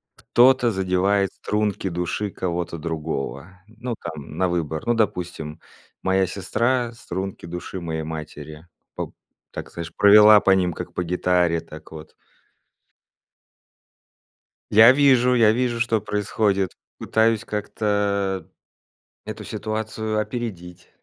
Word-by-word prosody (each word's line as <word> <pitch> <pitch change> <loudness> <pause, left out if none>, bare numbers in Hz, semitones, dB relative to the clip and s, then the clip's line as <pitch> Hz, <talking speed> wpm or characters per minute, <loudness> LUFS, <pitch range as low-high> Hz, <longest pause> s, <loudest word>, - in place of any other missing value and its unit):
кто-то 125 -1 +4
задевает 95 +1 +1
струнки 105 -2 -2
души 90 +4 -2
кого-то 85 -2 -3
другого, 80 +1 -5
ну 115 +2 -6
там 80 -2 -8
на 95 - +2
выбор. 80 -3 -2
Ну 120 - +2
допустим, 90 -8 -2 0.4
моя 95 0 +2
сестра 120 +6 -1
струнки 95 -5 -6
души 90 +2 -6
моей 80 -1 -3
матери. 75 0 -8 0.3
Поп - - -6 0.4
так - - -8
знаешь, 85 0 -7
провела 105 +1 +8
по 95 - +3
ним 90 -3 +2
как - - -7
по 90 - -2
гитаре, 90 -1 +1
так, 80 0 -13
вот. 80 0 -11 2.6
Я 110 +3 +9
вижу 130 -3 +4
я 110 -3 +5
вижу, 120 -1 -1
что 115 -2 +1
происходит, 100 -2 0 0.3
пытаюсь 110 -1 +1
как-то 100 -3 -1 0.8
эту - - -7
ситуацию 110 0 -3
опередить, 95 -7 -5
95 Hz, 115 wpm, -23 LUFS, 85-110 Hz, 2.6 s, Я